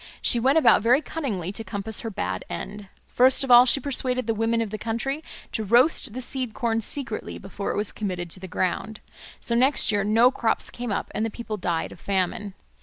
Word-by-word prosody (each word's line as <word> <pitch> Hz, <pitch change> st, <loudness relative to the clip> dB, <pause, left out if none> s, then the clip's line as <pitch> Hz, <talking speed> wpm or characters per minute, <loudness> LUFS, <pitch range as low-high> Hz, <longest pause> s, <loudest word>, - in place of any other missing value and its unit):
She 240 Hz, -, +3 dB
went 265 Hz, +6 st, +3 dB
about 320 Hz, -, +5 dB
very 240 Hz, +5 st, +4 dB
cunningly 220 Hz, -, -4 dB
to 225 Hz, +3 st, -3 dB
compass 215 Hz, 0 st, -3 dB
her 225 Hz, -, -4 dB
bad 95 Hz, -, -3 dB
end. 205 Hz, -1 st, -7 dB, 0.2 s
First 260 Hz, +2 st, +4 dB
of 270 Hz, -, -1 dB
all 245 Hz, +1 st, +9 dB
she 275 Hz, -, +5 dB
persuaded 255 Hz, -2 st, -1 dB
the 225 Hz, -, 0 dB
women 225 Hz, +1 st, 0 dB
of 225 Hz, -3 st, -2 dB
the 215 Hz, -, -5 dB
country 270 Hz, +7 st, -3 dB, 0.3 s
to 220 Hz, -, -2 dB
roast 240 Hz, +3 st, +3 dB
the 255 Hz, -, -5 dB
seed 255 Hz, -2 st, -3 dB
corn 225 Hz, -1 st, 0 dB
secretly 235 Hz, -1 st, -3 dB
before 195 Hz, +1 st, -6 dB
it -, -, -3 dB
was 210 Hz, -2 st, -2 dB
committed 180 Hz, -5 st, -4 dB
to 185 Hz, -, +1 dB
the 190 Hz, -, -8 dB
ground. 185 Hz, +4 st, -2 dB, 0.4 s
So 235 Hz, -, -2 dB
next 255 Hz, -1 st, +2 dB
year 205 Hz, -1 st, +1 dB
no 225 Hz, +5 st, +4 dB
crops 230 Hz, -4 st, -1 dB
came 240 Hz, -2 st, -5 dB
up -, -, -3 dB
and 215 Hz, -, -1 dB
the 225 Hz, -, -1 dB
people 225 Hz, -1 st, -6 dB
died 175 Hz, -4 st, -2 dB
of -, -, -12 dB
famine. 195 Hz, +1 st, -2 dB
225 Hz, 215 wpm, -24 LUFS, 200-250 Hz, 0.4 s, all